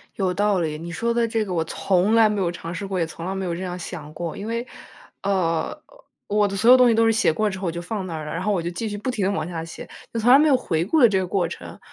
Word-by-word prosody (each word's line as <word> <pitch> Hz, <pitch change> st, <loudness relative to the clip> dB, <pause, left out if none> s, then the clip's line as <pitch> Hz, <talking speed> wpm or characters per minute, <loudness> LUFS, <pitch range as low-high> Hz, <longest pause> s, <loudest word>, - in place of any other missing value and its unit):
有 185 Hz, -2 st, 0 dB
道 205 Hz, 0 st, +1 dB
理， 155 Hz, -3 st, -2 dB
你 170 Hz, +2 st, -7 dB
说 235 Hz, +7 st, -1 dB
的 235 Hz, 0 st, +1 dB
这 225 Hz, -1 st, 0 dB
个 190 Hz, -3 st, -5 dB
我 165 Hz, -2 st, +1 dB
从 185 Hz, +5 st, +1 dB
来 225 Hz, -1 st, +6 dB
没 210 Hz, -1 st, -1 dB
有 175 Hz, -3 st, 0 dB
尝 170 Hz, 0 st, -7 dB
试 200 Hz, -, -5 dB
过， 195 Hz, -1 st, -2 dB
也 165 Hz, -, +1 dB
从 165 Hz, +1 st, -8 dB
来 190 Hz, -, -2 dB
没 190 Hz, 0 st, -3 dB
有 170 Hz, -2 st, -2 dB
这 175 Hz, -, -6 dB
样 180 Hz, -1 st, -4 dB
想 160 Hz, -4 st, -8 dB
过。 165 Hz, 0 st, -5 dB
因 200 Hz, -, -6 dB
为， 230 Hz, +2 st, -3 dB, 0.6 s
呃， 185 Hz, -, 0 dB, 0.5 s
我 205 Hz, 0 st, +2 dB
的 195 Hz, -, -4 dB
所 225 Hz, +5 st, +3 dB
有 255 Hz, -, +10 dB
东 250 Hz, -1 st, +6 dB
西 235 Hz, -, +4 dB
都 225 Hz, 0 st, +3 dB
是 225 Hz, -, +4 dB
写 220 Hz, -7 st, +2 dB
过 215 Hz, +6 st, 0 dB
之 190 Hz, -, -5 dB
后， 190 Hz, -, -5 dB
我 -, -, 0 dB
就 170 Hz, +1 st, -5 dB
放 190 Hz, +2 st, -4 dB
那 175 Hz, -, -6 dB
儿 155 Hz, -1 st, -5 dB
了， 150 Hz, -, -6 dB
然 165 Hz, -, -3 dB
后 210 Hz, +1 st, +1 dB
我 185 Hz, -, 0 dB
就 170 Hz, -, -3 dB
继 200 Hz, +6 st, -4 dB
续 205 Hz, -, -4 dB
不 215 Hz, +5 st, -4 dB
停 215 Hz, -6 st, -1 dB
地 195 Hz, -, +1 dB
往 200 Hz, -, -2 dB
下 165 Hz, -2 st, -5 dB
写。 165 Hz, -, -10 dB, 0.2 s
就 230 Hz, -, -1 dB
从 235 Hz, +3 st, +4 dB
来 265 Hz, -, +9 dB
没 305 Hz, +2 st, +4 dB
有 285 Hz, -, +5 dB
回 170 Hz, -10 st, -1 dB
顾 310 Hz, -, +2 dB
的 240 Hz, -, +8 dB
这 195 Hz, -, +1 dB
个 190 Hz, -, 0 dB
过 180 Hz, -1 st, 0 dB
程， 170 Hz, -, -9 dB
190 Hz, 350 characters per minute, -23 LUFS, 170-220 Hz, 0.6 s, 有